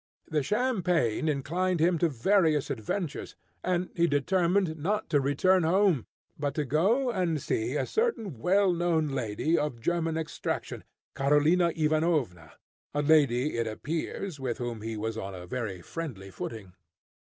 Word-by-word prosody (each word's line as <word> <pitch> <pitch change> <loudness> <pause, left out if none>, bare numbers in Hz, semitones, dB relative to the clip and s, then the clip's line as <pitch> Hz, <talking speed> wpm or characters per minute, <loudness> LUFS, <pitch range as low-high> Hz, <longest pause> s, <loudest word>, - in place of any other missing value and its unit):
The 155 -2 0
champagne 180 - +1
inclined 170 +6 0
him 170 +1 +3
to 170 - +3
various 155 - +2
adventures, 145 - -4 0.3
and 180 0 -1
he 170 0 +3
determined 170 +3 +1
not 205 +3 -1
to 145 -3 +4
return 180 +7 +3
home, 175 - +2 0.3
but 145 -1 -2
to 150 - 0
go 205 - +2
and 180 -7 0
see 120 0 -1
a - - 0
certain 230 - -1
well 190 - +3
known 170 -3 +1
lady, 135 +5 0
of 145 -6 -2
German 165 +4 0
extraction, 160 -1 -4 0.3
Karolina 150 +5 +3
Ivanovna, 150 - 0 0.4
a 145 - +1
lady, 145 -3 +3
it 115 - 0
appears, 155 - -4
with 125 -3 -2
whom 120 -3 -4
he 110 0 -4
was 110 +1 -3
on 95 -2 -6
a 90 -1 -8
very 100 -4 -4
friendly 120 -13 -6
footing. 100 -1 -7
155 Hz, 145 wpm, -28 LUFS, 125-180 Hz, 0.4 s, to